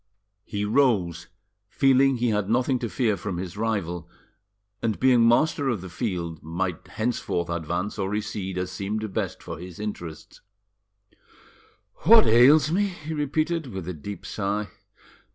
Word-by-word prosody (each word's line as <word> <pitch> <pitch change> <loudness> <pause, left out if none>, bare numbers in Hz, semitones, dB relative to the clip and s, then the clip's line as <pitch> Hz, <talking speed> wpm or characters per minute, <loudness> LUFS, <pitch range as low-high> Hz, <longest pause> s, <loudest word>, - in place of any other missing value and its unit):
He 105 -1 -3
rose, 105 - +2 0.4
feeling 135 -1 +4
he 120 0 +1
had 105 -2 0
nothing 125 +2 +2
to 120 - -3
fear 115 -4 +1
from 95 -1 -4
his 90 0 -5
rival, 90 -6 -2 0.7
and, 110 -3 -1
being 125 -3 +5
master 140 +3 +3
of 110 -7 -1
the 90 -2 -9
field, 85 -6 -3
might 85 +2 -3
henceforth 110 -6 -2
advance 85 +5 -3
or 95 -1 -1
recede 105 -3 -3
as 90 0 -2
seemed 105 +1 -3
best - - -3
for - - -7
his 90 0 -9
interests. 85 -7 -7 1.6
"What 225 0 +7
ails 140 +6 +6
me?" 200 +4 +2
he 160 -4 -7
repeated, 155 +2 -1
with 95 -7 -6
a 90 - -3
deep 100 +6 -8
sigh. 105 0 -2
105 Hz, 145 wpm, -25 LUFS, 90-130 Hz, 1.6 s, What